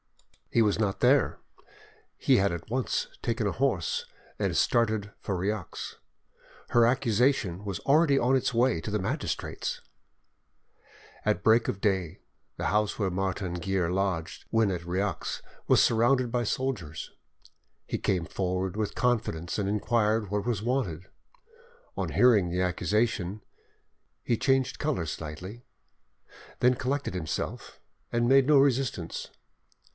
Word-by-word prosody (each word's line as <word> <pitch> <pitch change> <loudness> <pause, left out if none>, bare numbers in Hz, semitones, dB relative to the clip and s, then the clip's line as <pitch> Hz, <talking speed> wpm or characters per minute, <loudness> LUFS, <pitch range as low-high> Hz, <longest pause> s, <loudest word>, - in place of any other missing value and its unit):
He 115 - +3
was 105 0 +1
not 100 -3 0
there: 135 +2 +3 0.8
he - - +3
had 100 -1 +2
at 85 +2 -6
once 130 - -1
taken - - -1
a - - -1
horse 480 0 0 0.3
and - - 0
started 110 -3 +1
for 95 - -3
Rieux. 100 0 -3 0.7
Her 120 -1 +5
accusation 115 -6 +1
was 100 -3 -4
already 145 0 +4
on 125 +3 +3
its 130 -1 0
way 120 -6 +2
to 105 - -5
the 105 - 0
magistrates! 95 - -3 1.4
At 90 - 0
break 115 +1 +4
of 100 - -3
day 95 -6 0 0.4
the - - -3
house 105 +1 +1
where 100 -4 0
Martin 95 -1 -2
Guerre 90 0 -1
lodged 95 -3 -2
when 110 -3 +2
at 90 -2 -3
Rieux 95 +3 -2 0.3
was - - +5
surrounded 120 +2 +3
by 120 0 0
soldiers. 105 - -3 0.7
He - - -3
came 90 -4 0
forward 95 0 -2
with 110 -1 -2
confidence 110 -9 0
and 100 -2 -1
inquired 105 -1 +1
what 105 0 -1
was 110 -4 -1
wanted. 100 - -1 0.9
On - - -2
hearing 110 -8 +4
the 90 +1 -1
accusation, 100 +1 0 0.8
he 120 - +1
changed 135 +2 +1
colour 145 - -1
slightly, 85 +9 -7 1.0
then 125 +1 +5
collected 135 -1 -2
himself, 90 -4 -4 0.3
and 120 0 +1
made 135 +1 +5
no 150 -1 +6
resistance. 135 -10 +1
105 Hz, 135 wpm, -28 LUFS, 95-125 Hz, 1.4 s, no